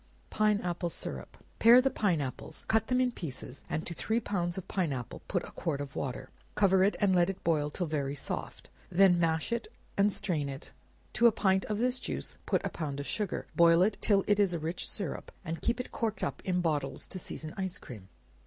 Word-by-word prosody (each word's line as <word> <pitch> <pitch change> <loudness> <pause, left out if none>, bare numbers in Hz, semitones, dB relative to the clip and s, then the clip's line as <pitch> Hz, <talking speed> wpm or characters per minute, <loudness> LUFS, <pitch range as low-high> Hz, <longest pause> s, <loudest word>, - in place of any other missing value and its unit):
Pine 215 -1 +3
Apple 175 0 -2
Syrup. - - -6 0.2
Pare 235 +2 +9
the 265 +1 +2
pine 180 -8 +1
apples, 130 -2 -6
cut 220 0 +2
them 250 0 +2
in 255 -1 +3
pieces, 140 - -7
and 160 - -2
to 175 - -3
three 220 +7 0
pounds 175 -6 -2
of 190 - -6
pine 180 -6 0
apple 125 -3 -5
put - - 0
a - - -9
quart 150 -4 -2
of 140 -2 -6
water; 130 -2 -4 0.2
cover 190 -2 +4
it 200 - +3
and 195 -2 +3
let 175 0 +4
it 195 - -5
boil 150 -3 +2
till 175 +4 -2
very 145 -3 -2
soft, 140 - -5 0.2
when 180 -1 +5
mash 160 +4 +1 0.4
and 200 +1 +4
strain 155 -8 -1
it; 135 +2 -8 0.4
to 235 +2 +6
a - - +6
pint 190 -2 +2
of 210 - -2
this 250 +3 +1
juice - - -5
put - - +1
a - - 0
pound 145 -4 -4
of 140 - -4
sugar, 210 +2 -2
boil 170 +1 +6
it 205 +2 +2
till 200 -2 +3
it 205 0 +3
is 195 -3 +3
a - - 0
rich 165 +3 -3
syrup, 195 -8 -4
and 165 0 -4
keep 235 +1 0
it 250 - -5
corked 220 -2 -2
up - - -2
in 180 -1 +1
bottles 145 -5 -1
to 185 - -7
season 155 -2 -5
ice 190 -2 -3
cream. 105 -10 -11
180 Hz, 220 wpm, -31 LUFS, 155-205 Hz, 0.4 s, Pare